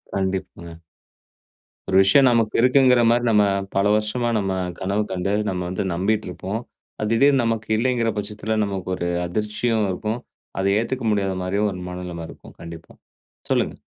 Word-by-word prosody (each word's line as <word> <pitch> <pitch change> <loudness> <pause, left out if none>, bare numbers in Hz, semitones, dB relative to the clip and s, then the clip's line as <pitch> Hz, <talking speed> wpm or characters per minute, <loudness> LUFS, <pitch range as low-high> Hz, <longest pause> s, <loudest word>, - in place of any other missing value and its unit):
கண்டிப்பாங்க. 95 -3 -4 1.1
ஒரு 95 - 0
விஷயம் 130 +8 +5
நமக்கு 115 -3 +1
இருக்கிறது 125 +3 +5
என்கிற 125 -2 +5
மாதிரி 120 +1 +3
நம்ம 105 -2 +4 0.3
பல 100 +1 +2
வருஷமாக, 115 +3 -1
நம்ம 95 -1 -1 0.3
கனவு 100 +3 0
கண்டு, 95 +1 -2 0.2
நம்ம 90 -1 -3
வந்து 95 +3 -2
நம்பிக்கொண்டிருப்போம். 95 +2 -2 0.4
அது 105 - -1
திடீரென்று 135 +3 +4
நமக்கு 115 -1 -1
இல்லை 130 +3 +1
என்கிற 115 -2 0
பட்சத்தில் 110 +1 -2
நமக்கு 95 -2 -5
ஒரு 85 -1 -3 0.2
அதிர்ச்சியும் 105 +3 -1
இருக்கும். 110 +5 -3 0.4
அதை 95 - +1
ஏற்றுக்கொள்ள 115 -1 -1
முடியாத 100 -2 -1
மாதிரியும் 100 +3 0
ஒரு 90 - -7
மனநிலை 90 -2 -6
இருக்கும் - - -14
கண்டிப்பாக. 85 -1 -11 0.5
சொல்லுங்க. - - +1
105 Hz, 150 wpm, -22 LUFS, 95-115 Hz, 1.1 s, விஷயம்